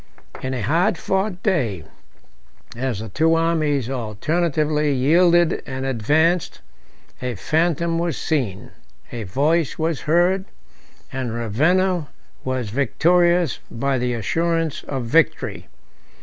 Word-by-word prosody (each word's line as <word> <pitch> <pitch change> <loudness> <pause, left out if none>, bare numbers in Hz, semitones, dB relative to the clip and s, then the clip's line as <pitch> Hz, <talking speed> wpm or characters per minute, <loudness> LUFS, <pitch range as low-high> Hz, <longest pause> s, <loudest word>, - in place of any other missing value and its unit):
In 130 0 -3
a 120 - -3
hard 170 - +2
fought 190 0 -2
day, 125 - 0 0.9
as 120 -4 -2
the 110 - -7
two 160 +10 +2
armies 155 -6 +1
alternately 150 - 0
yielded 170 +5 +3
and 130 -1 -4
advanced, 155 +8 +1 0.6
a 125 -2 -3
phantom 165 - 0
was 170 -5 -1
seen, 125 -6 -2 0.4
a 115 -3 -5
voice 150 - +1
was 160 -2 -1
heard, 180 +3 +3 0.7
and 130 -4 -3
Ravenna 155 - +1 0.4
was 130 -5 -3
victorious 170 +6 +2
by 135 +2 -1
the 125 0 -1
assurance 165 +6 -1
of 135 -4 -4
victory. 160 +7 +1
150 Hz, 110 wpm, -21 LUFS, 125-170 Hz, 0.9 s, yielded